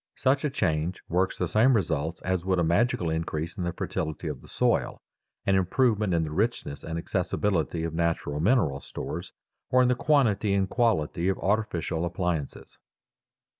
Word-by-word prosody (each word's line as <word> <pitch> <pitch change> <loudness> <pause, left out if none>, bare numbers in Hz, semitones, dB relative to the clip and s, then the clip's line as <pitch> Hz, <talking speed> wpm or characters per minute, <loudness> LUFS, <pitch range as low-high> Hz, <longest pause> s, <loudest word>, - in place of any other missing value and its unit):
Such 135 +2 +2
a 150 - +1
change 85 - -1
works 95 +3 +1
the 90 - 0
same 110 +9 +4
results 80 -4 -1
as 95 -2 -1
would 95 0 +1
a 85 - +2
magical 85 0 +1
increase 80 0 -3
in 95 - -3
the 85 - -1
fertility 80 -2 -4
of - - -6
the - - -15
soil, - - 0 0.5
an 100 - +3
improvement 105 0 +2
in 80 - +2
the 75 - -4
richness 100 -6 -2
and 80 +1 -4
accessibility 85 -1 -1
of 85 -1 -3
natural 80 -3 -1
mineral 85 - +2
stores, - - -6 0.4
or 130 0 +5
in 125 - +3
the - - +4
quantity 120 -8 +2
and 95 -1 0
quality 95 -7 +1
of 95 - 0
artificial 95 -6 -1
appliances. 85 -4 -3
90 Hz, 170 wpm, -27 LUFS, 80-110 Hz, 0.5 s, or